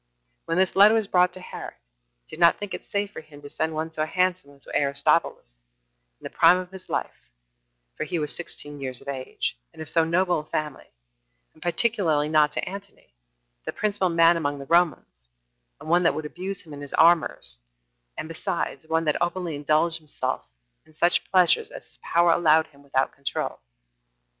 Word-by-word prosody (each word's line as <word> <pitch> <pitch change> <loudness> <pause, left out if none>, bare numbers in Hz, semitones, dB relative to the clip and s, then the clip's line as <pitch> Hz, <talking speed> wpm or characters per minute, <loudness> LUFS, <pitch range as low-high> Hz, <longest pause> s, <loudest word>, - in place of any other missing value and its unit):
When 165 +1 -1
this 190 -1 +2
letter 205 +3 +7
was 220 -2 +2
brought 180 -2 +3
to - - -8
Herod, 185 - -8 0.5
he - - -10
did - - -14
not 170 -1 +6
think 205 -1 -6
it - - -7
safe 200 0 -2
for - - -8
him 150 -2 -15
to 145 - -9
send 160 0 -2
one 160 +1 -3
so 155 - -1
handsome 180 -1 0
as 140 -1 -13
was - - -11
Aristobulus, 140 - 0 0.6
in - - -25
the - - -5
prime 180 - +6
of 185 0 -6
his 190 -1 -11
life, - - -4 0.7
for - - -3
he 175 - -3
was 150 -2 -2
sixteen 145 -4 -6
years 130 -2 -1
of - - -17
age, 135 -2 -4 0.2
and - - -18
of 155 - -5
so 165 - +3
noble 175 +1 +1
a 150 - -9
family, 150 -2 -4 0.7
and 155 - -23
particularly 175 -6 +1
not 155 -1 +4
to - - -3
Antony, 195 - -10 0.5
the - - -4
principal 200 -3 0
man 165 0 +5
among 145 -3 -2
the 140 - -8
Romans, 160 - +1 0.5
and - - -11
one 175 +2 +4
that 170 - +2
would 155 - -4
abuse 185 +5 -5
him 155 -4 -12
in 145 - -8
his 145 - -5
amours, 165 - +3 0.6
and - - -5
besides, 165 0 -4
one 160 0 +1
that 150 - 0
openly 175 -1 -1
indulged 155 +3 +1
himself 145 -4 -3 0.4
in 155 - -24
such 175 +3 +2
pleasures 190 - +4
as - - -11
his - - -7
power 170 0 +3
allowed 160 -2 +4
him 140 -3 -22
without 135 -1 0
control. 140 -1 -4
160 Hz, 195 wpm, -25 LUFS, 150-180 Hz, 0.7 s, letter